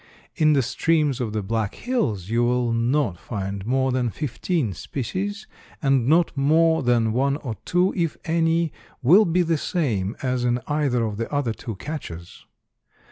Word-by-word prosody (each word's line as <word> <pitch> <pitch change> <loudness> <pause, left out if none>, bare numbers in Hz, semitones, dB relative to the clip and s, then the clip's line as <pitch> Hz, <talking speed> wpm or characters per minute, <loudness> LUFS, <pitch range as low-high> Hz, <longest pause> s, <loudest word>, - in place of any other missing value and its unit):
In 155 -3 +4
the 135 -2 +3
streams 145 +1 +1
of 115 -3 -2
the 105 -1 -2
Black 110 0 -2
Hills 120 - -1
you 115 +2 +2
will 120 -1 +1
not 115 - +1
find 100 -2 -5
more 130 +1 +1
than 125 -2 0
fifteen 150 - -2
species, 190 - -4 0.3
and 135 -5 +2
not 165 +3 +3
more 160 +3 +3
than 120 -3 +2
one 140 +3 +1
or 125 -7 -5
two, 180 +2 +2
if 165 -4 -1
any, 165 0 +1 0.3
will 185 - +7
be 175 +2 +2
the 165 -2 0
same 115 - -1
as 125 -1 0
in 120 0 +1
either 145 -5 +1
of 105 -2 -4
the 115 - -4
other 145 -6 0
two 115 -2 -7
catches. 90 - -8
135 Hz, 165 wpm, -23 LUFS, 115-160 Hz, 0.3 s, will